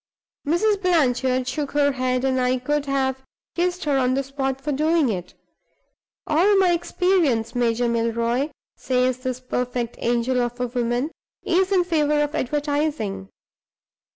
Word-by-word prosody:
Mrs. 395 +6 +2
Blanchard 260 -7 +2
shook 290 +1 -3
her 285 -1 +3
head; 255 -1 -1
I 255 -1 +1
could 290 +3 -1
have 265 -1 0 0.3
kissed 355 +1 -1
her 285 -3 +1
on 255 0 +2
the 275 - 0
spot 270 -1 -3
for 295 +2 -3
doing 310 0 +2
it. 180 -4 -4 0.9
'All 370 +7 +3
my 375 -2 +4
experience, 340 - +1
Major 240 0 +1
Milroy,' 235 +4 0 0.3
says 255 0 0
this 255 -1 -3
perfect 250 -2 -3
angel 240 +2 +1
of 240 0 -3
a 250 - 0
woman, 245 +4 -1 0.3
'is 375 +2 +1
in 370 -2 +4
favor 300 -4 +1
of 295 0 0
advertising. 285 -9 -2
265 Hz, 140 wpm, -23 LUFS, 245-305 Hz, 0.9 s, my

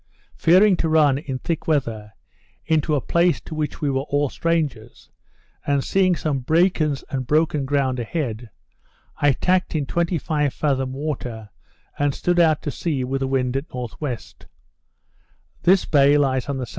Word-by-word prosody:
Fearing 185 +4 +5
to 165 - 0
run, 150 -4 +4
in 135 -4 -5
thick 165 +4 -4
weather, 115 -9 -1 0.5
into 155 -1 +1
a 140 - 0
place 170 +4 +2
to - - -9
which 155 +1 -4
we 145 - 0
were 135 0 0
all 145 0 +1
strangers, 150 -10 -3 0.6
and 140 -1 +1
seeing 185 -2 +2
some 150 -4 -2
breakers 155 0 +1
and 130 -2 -3
broken 155 -1 +1
ground 135 -2 0
a - - -2
head, 120 -5 -4 0.7
I 145 -1 +3
tacked 185 +4 0
in 150 -3 0
twenty 170 +3 0
five 150 -2 -1
fathom 135 -3 0
water, 125 -7 -5 0.5
and 145 -1 +1
stood 175 0 0
out 160 -3 +3
to 145 - -2
sea 145 -5 -2
with 135 +2 -2
the 135 - 0
wind 130 -1 0
at 135 +2 -1
N.W. 125 +1 -4 1.4
This 190 +2 +4
bay 145 0 +4
lies 130 -2 0
on 140 - -2
the 130 - -3
S.E. 120 - -7
145 Hz, 170 wpm, -22 LUFS, 130-160 Hz, 1.4 s, Fearing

